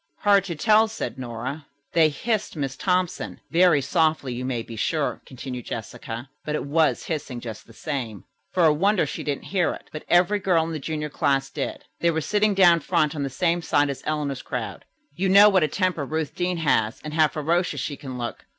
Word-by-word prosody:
"Hard 200 -2 +4
to 170 -3 -4
tell," 215 +6 +4
said 130 - -5
Nora. 125 +4 -5 0.3
"They 160 -2 +5
hissed 215 +8 -2
Miss 135 -3 -3
Thompson. 180 -2 -1
Very 170 -4 +5
softly, 155 -5 +1
you 125 +1 -4
may 125 -3 -2
be 115 - -9
sure," 150 +6 -1
continued 125 -2 -7
Jessica, 115 +2 -6 0.2
"but 150 - -2
it - - -3
was 155 +2 +2
hissing, 145 -6 -4
just 115 -3 -8
the 115 - -15
same. 120 - -4 0.3
For 180 -2 +3
a 155 - +6
wonder, 195 +3 +2
she - - -5
didn't 145 -2 -3
hear 180 -3 +2
it, - - -16
but 155 - -7
every 180 +4 +4
girl 180 -4 +2
in 165 - -4
the 160 - -3
junior 150 +1 -3
class 135 -1 0
did. - - -4
They 170 - +3
were 160 -1 0
sitting 210 +4 +1
down 175 -3 +6
front 155 -2 +1
on 145 - -3
the 140 - -1
same 170 +5 0
side 145 -3 +2
as 135 -1 -7
Eleanor's 145 -4 -2
crowd. - - -5 0.3
You 190 +2 0
know 200 +2 +8
what 190 -3 +3
a 155 - +3
temper 180 0 0
Ruth 155 0 -3
Deane 180 0 -1
has 120 -7 +1
and 155 0 -6
how 155 -1 +5
ferocious 155 +2 -1
she 145 +2 -3
can 135 -3 -7
look? 120 -1 -6
155 Hz, 210 wpm, -24 LUFS, 135-175 Hz, 0.3 s, know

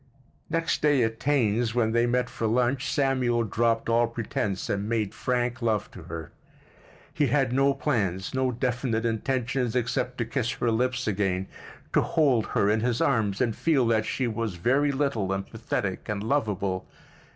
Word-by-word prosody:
Next 165 0 0
day 145 -4 +4
at 110 0 -2
Taine's, 120 -5 +1
when 110 -2 +2
they 120 +1 +2
met 125 +1 +1
for 115 - -3
lunch, 125 +4 +1
Samuel 130 -4 +1
dropped 115 +2 0
all 115 0 +3
pretense 105 -4 -3
and 100 +1 -2
made 110 -4 0
frank 125 0 -1
love 110 -3 0
to 95 - -10
her. 80 -3 -7 0.8
He 145 - +2
had 135 -4 +1
no 135 +1 +3
plans, 95 - -1
no 130 -1 +1
definite 120 -1 -1
intentions, 125 +1 -1
except 125 +1 -1
to 120 - -1
kiss 120 +1 -1
her 120 - 0
lips 125 +2 0
again, 95 -3 0 0.5
to - - +5
hold 135 -8 +2
her 100 - +1
in 105 +2 +3
his 120 +1 0
arms 110 -7 +1
and 115 -3 +1
feel 145 -7 +2
that 110 -1 +2
she 130 - -1
was 115 -4 -2
very 135 +11 +2
little 135 -9 -1
and 95 0 -2
pathetic 105 -4 -4
and 105 -1 -2
lovable. 100 -7 -1
120 Hz, 170 wpm, -26 LUFS, 110-130 Hz, 0.8 s, to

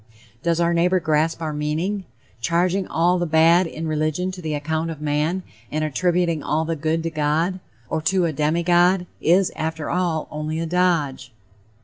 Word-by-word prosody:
Does 170 +1 +1
our 170 0 +2
neighbor 180 +2 +3
grasp 160 +1 0
our 155 -1 -2
meaning? 160 +7 -2 0.4
Charging 180 +7 +1
all 175 +2 +2
the 175 - -1
bad 165 +3 +5
in 160 0 -6
a - - -2
religion 155 +4 -1
to 185 -1 -9
the 155 -2 -2
account 160 +2 -2
of 160 -3 -6
man, 150 +5 -1 0.3
and 155 +1 -1
attributing 170 +1 +1
all 155 +3 0
the 165 0 -1
good 160 +2 -1
to 165 - -2
God, 160 +4 0 0.3
or 160 +5 -2
to 185 +2 +2
a 160 - -1
demi 155 +4 0
god, 175 +1 +3 0.2
is, 180 +3 +3
after 160 -1 -3
all, 170 -3 0
only 155 +1 -3
a 165 - -1
dodge. 170 -5 0
165 Hz, 180 wpm, -22 LUFS, 155-175 Hz, 0.4 s, bad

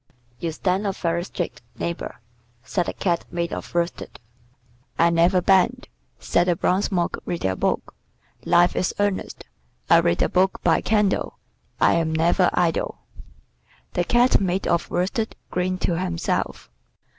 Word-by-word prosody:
"You 170 - -2
stand 190 +5 -1
up 195 - -2
very 170 0 -1
straight, 165 -11 -5 0.2
neighbor," 170 -6 -4 0.4
said 180 -3 -1
the - - -2
Cat 175 -3 -1
made 170 0 -3
of - - -6
worsted. 170 0 -2 0.8
"I 170 0 +4
never 170 +2 +3
bend," 190 -1 +3 0.3
said 175 +1 +1
the 175 - +3
bronze 185 +5 0
Monk 175 -3 0
reading 165 - -2
a - - -3
book. - - -1 0.5
"Life 175 0 +4
is 180 - -1
earnest. 205 -2 -2 0.5
I - - +8
read 85 - +2
a - - +2
book 190 +1 +1
by 165 -2 +3
candle. 210 -2 0 0.4
I - - +4
am 165 -1 0
never 170 +3 +3
idle." 170 -2 0 1.0
The - - +1
Cat 240 +4 +3
made 190 0 -1
of 170 - 0
worsted 220 +5 -1 0.2
grinned 185 +1 -1
to 170 -2 0
himself. 170 - -2
175 Hz, 150 wpm, -23 LUFS, 170-190 Hz, 1.0 s, I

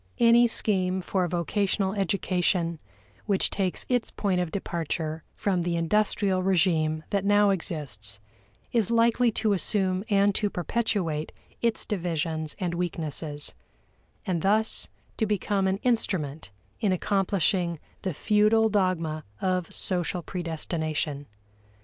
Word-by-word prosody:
Any 235 0 +6
scheme 190 -4 +2
for 185 0 0
vocational 190 +3 0
education 180 -3 0 0.5
which 200 -3 +2
takes 190 -3 0
its 245 -2 0
point 190 -3 0
of 175 - -2
departure 160 -4 -3
from 190 -3 0
the 170 0 -1
industrial 195 +2 +1
regime 165 -4 +2
that 200 -2 +1
now 205 0 +4
exists, 130 - -2 0.5
is 225 -5 +2
likely 235 +1 +3
to 215 0 +1
assume 190 0 +1
and 200 0 +4
to 205 +1 +1
perpetuate 175 -5 -1 0.3
its 230 -1 0
divisions 165 -5 -2
and 180 -3 -1
weaknesses, 160 -4 -3 0.7
and 175 -3 -1
thus 215 +4 +2 0.3
to 220 - +1
become 200 -1 0
an 190 0 +1
instrument 180 - -1 0.3
in 205 - +1
accomplishing 185 -2 +1 0.2
the 185 -5 -3
feudal 215 +4 +3
dogma 175 -6 0 0.2
of 185 -2 -1
social 180 -1 0
predestination. 160 -4 -3
185 Hz, 120 wpm, -27 LUFS, 165-205 Hz, 0.7 s, Any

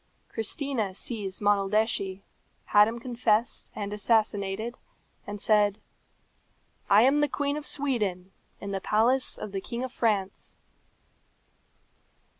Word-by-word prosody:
Christina 225 -3 -3
seized 200 -3 -5
Monaldeschi, 200 -1 +1 0.4
had 210 0 +6
him 230 +1 -3
confessed 235 -2 0
and 205 0 -4
assassinated, 215 +1 0 0.5
and 205 0 -5
said, 205 -1 +3 1.1
"I 205 +2 +7
am 280 +4 +4
the 295 - +3
Queen 285 +1 -1
of 300 -1 -4
Sweden, 210 -10 -1 0.3
in 200 - -6
the 195 -1 -2
palace 240 +7 +2
of 210 - -6
the 195 -1 -3
King 235 +5 -5
of 260 - -4
France." 205 -6 -1
215 Hz, 115 wpm, -27 LUFS, 200-240 Hz, 1.1 s, I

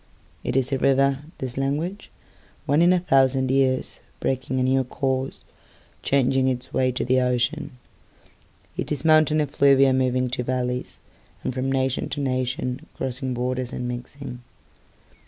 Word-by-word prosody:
It - - -2
is 135 0 +1
a 135 - 0
river, 135 0 +3 0.2
this 130 -2 -5
language, 155 +9 -2 0.6
Once 145 +4 +3
in 175 +1 +6
a 185 - +4
thousand 135 -5 +3
yearsBreaking 130 -1 -1
a - - +2
new 130 +1 +2
courseChanging 130 0 -2
its 125 -1 -6
way 130 0 +2
to 125 - -2
the 130 +1 +3
ocean.It 125 +2 -5
is 145 -1 0
mountain 155 -1 +5
effluviaMoving 130 -3 +3
to 125 - -1
valleysAnd 125 0 -5
from 130 +1 -1
nation 130 -1 0
to 145 - -4
nationCrossing 130 0 -3
borders 125 0 -2
and 125 - -4
mixing. 125 +1 -7
130 Hz, 120 wpm, -24 LUFS, 125-135 Hz, 0.6 s, in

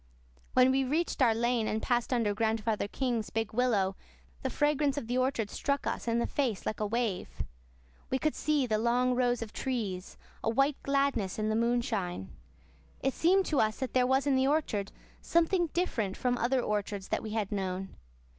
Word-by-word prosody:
When 255 0 +6
we 270 +1 +2
reached 305 +3 -1
our 230 -3 +5
lane 235 -1 +1
and 220 - 0
passed 240 +1 0
under 230 -5 +2
Grandfather 220 0 0
King's 235 -2 -2
big 225 -1 -2
willow 215 -6 +2 0.5
the - - -1
fragrance 295 -1 +1
of 285 - -2
the 245 +2 0
orchard 255 -5 0
struck 280 0 -1
us - - -3
in 230 0 +2
the 235 - +1
face 250 -8 -1
like 215 - -2
a 210 - 0
wave. 225 -3 -2 0.7
We 260 - +1
could 310 +3 0
see 300 -3 +1
the 215 -3 0
long 245 +2 +2
rows 245 -1 +1
of 220 -1 -10
trees, 210 -8 -3 0.3
a - - +1
white 275 +5 +2
gladness 275 -9 0
in 215 0 0
the 215 - +1
moonshine. 225 - -1 0.7
It 270 - +1
seemed 375 +3 +3
to 300 - +1
us 215 0 +2
that 260 - -4
there 250 -1 +3
was 265 +2 +2
in 280 -2 +3
the 260 0 +3
orchard 250 -10 0 0.3
something 340 +1 +2
different 245 - -1
from 250 -1 +1
other 250 +2 +1
orchards 205 -2 -2
that - - 0
we 215 -1 -5
had 215 -3 -1
known. 190 -1 -3
240 Hz, 190 wpm, -30 LUFS, 215-270 Hz, 0.7 s, When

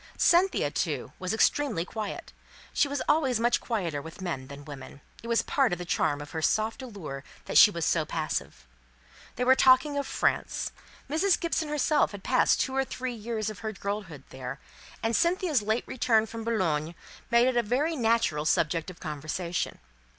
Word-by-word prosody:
Cynthia, 345 - +3
too, 145 -6 -2
was 185 0 -2
extremely 225 -4 +1
quiet; 215 +1 -6 0.4
she - - +3
was 285 0 -2
always 270 -6 +2
much 240 +1 +2
quieter 175 - -2
with 160 +2 -11
men 165 -9 -4
than 140 +1 -9
with 145 - -16
women; 140 -1 -10 0.2
it 230 - -9
was 235 -1 +2
part 270 -3 +2
of 175 - -1
the 175 - -6
charm 145 -3 0
of 145 - -9
her 160 - -3
soft 220 - +1
allurement 185 - -7 0.2
that - - +4
she - - +10
was - - -3
so - - +2
passive. - - -4 0.7
They 250 - -1
were 260 +1 +6
talking 265 +3 +4
of 280 - -3
France. - - 0 0.4
Mrs. 345 +5 +2
Gibson 325 -2 -1
herself 300 -4 +2
had 200 -1 -8
passed 255 - +3
two 265 - -1
or 270 - +2
three 255 -1 -4
years 220 -1 -3
of 210 - -11
her 220 -1 -4
girlhood 195 -8 -5
there; 130 +1 -6 0.4
and 225 0 +1
Cynthia's 340 - +2
late 220 +3 0
return 225 -3 +2
from 225 +1 -7
Boulogne 170 -8 0 0.3
made 235 +1 +5
it 260 - +1
a 240 - +4
very 265 +9 0
natural 225 - +1
subject 165 +2 +1
of 180 - -11
conversation. 155 +3 -3
220 Hz, 185 wpm, -28 LUFS, 165-260 Hz, 0.7 s, she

